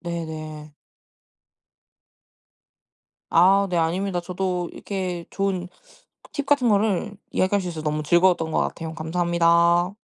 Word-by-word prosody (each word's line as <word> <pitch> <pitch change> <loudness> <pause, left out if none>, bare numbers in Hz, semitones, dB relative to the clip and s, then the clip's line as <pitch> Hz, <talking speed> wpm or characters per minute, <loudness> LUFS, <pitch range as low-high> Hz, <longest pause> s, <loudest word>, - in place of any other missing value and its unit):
네네. 155 -3 -6 2.6
아 195 +4 +5
네. 175 - 0
아닙니다. 175 +3 0
저도 180 0 -3
이렇게 180 -4 -4
좋은 190 -2 -2 0.7
팁 285 -3 -3
같은 275 -5 +3
거를 205 -1 +1 0.2
이야기할 195 +1 +1
수 180 - -5
있어서 160 -2 -6
너무 150 0 -1
즐거웠던 170 0 +3
것 - - +1
같아요. 160 -1 -3
감사합니다. 170 +2 +2
175 Hz, 255 characters per minute, -23 LUFS, 165-190 Hz, 2.6 s, 아